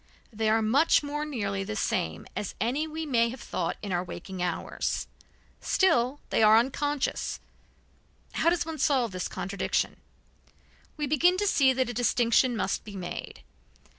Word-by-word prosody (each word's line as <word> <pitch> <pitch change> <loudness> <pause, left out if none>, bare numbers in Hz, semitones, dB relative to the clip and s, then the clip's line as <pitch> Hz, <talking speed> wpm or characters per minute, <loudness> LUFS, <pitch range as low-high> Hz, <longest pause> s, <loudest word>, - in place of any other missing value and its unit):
They 220 0 0
are 220 0 +3
much 280 +9 +4
more 295 +1 -3
nearly 200 -9 -2
the 215 +2 -5
same 80 - -1
as 205 - -4
any 260 - 0
we 320 +1 -5
may 235 -5 +2
have 255 +2 -7
thought 170 -6 -3
in 200 - -4
our 175 0 0
waking 185 +1 -7
hours. 175 -2 -2 0.5
Still 280 -8 +2
they - - +2
are 215 0 +7
unconscious; 275 +4 -1 0.9
how 330 - +2
does 340 -4 0
one 320 -2 -6
solve 260 -6 +2
this 185 -1 -3
contradiction? 195 +2 -2 1.0
We 300 - -1
begin 325 +6 +3
to 410 - 0
see 275 -9 +4
that 260 -1 0
a - - -7
distinction 240 +1 +3
must 195 - -1
be 205 -2 -9
made. 180 -2 -6
240 Hz, 160 wpm, -28 LUFS, 205-290 Hz, 1.0 s, are